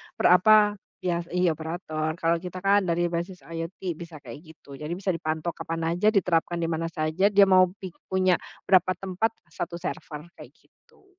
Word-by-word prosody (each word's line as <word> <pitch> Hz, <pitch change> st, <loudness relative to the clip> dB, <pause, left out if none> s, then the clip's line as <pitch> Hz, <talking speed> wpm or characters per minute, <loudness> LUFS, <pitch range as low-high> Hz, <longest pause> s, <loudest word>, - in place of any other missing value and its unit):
per, -, -, +3 dB
apa, 210 Hz, +2 st, +5 dB, 0.2 s
iya 175 Hz, -2 st, 0 dB, 0.2 s
iya 180 Hz, -2 st, +3 dB
operator. 160 Hz, -1 st, -4 dB
Kalau 165 Hz, -1 st, +1 dB
kita 180 Hz, +1 st, -8 dB
kan 200 Hz, +1 st, +5 dB
dari 170 Hz, 0 st, 0 dB
basis 175 Hz, +2 st, -4 dB
IoT 165 Hz, +2 st, -6 dB, 0.2 s
bisa 170 Hz, -2 st, -9 dB
kayak 120 Hz, +3 st, -9 dB, 0.2 s
gitu. -, -, -24 dB
Jadi 155 Hz, +3 st, -4 dB
bisa 195 Hz, -1 st, 0 dB
dipantau 160 Hz, 0 st, -2 dB
kapan 165 Hz, 0 st, -5 dB
aja, 180 Hz, +5 st, +1 dB
diterapkan 175 Hz, -2 st, +2 dB
di 165 Hz, -, 0 dB
mana 165 Hz, +1 st, -1 dB
saja, 165 Hz, +3 st, +1 dB
dia 200 Hz, -1 st, +6 dB
mau 185 Hz, -1 st, +6 dB
pik 185 Hz, -3 st, -11 dB
punya 185 Hz, -1 st, +3 dB, 0.3 s
berapa 185 Hz, -1 st, +4 dB
tempat, 195 Hz, +4 st, -1 dB, 0.2 s
1 170 Hz, +1 st, -5 dB
server 170 Hz, -2 st, -6 dB
kayak -, -, -14 dB
gitu. 460 Hz, -5 st, -29 dB
175 Hz, 175 wpm, -26 LUFS, 165-190 Hz, 0.3 s, dia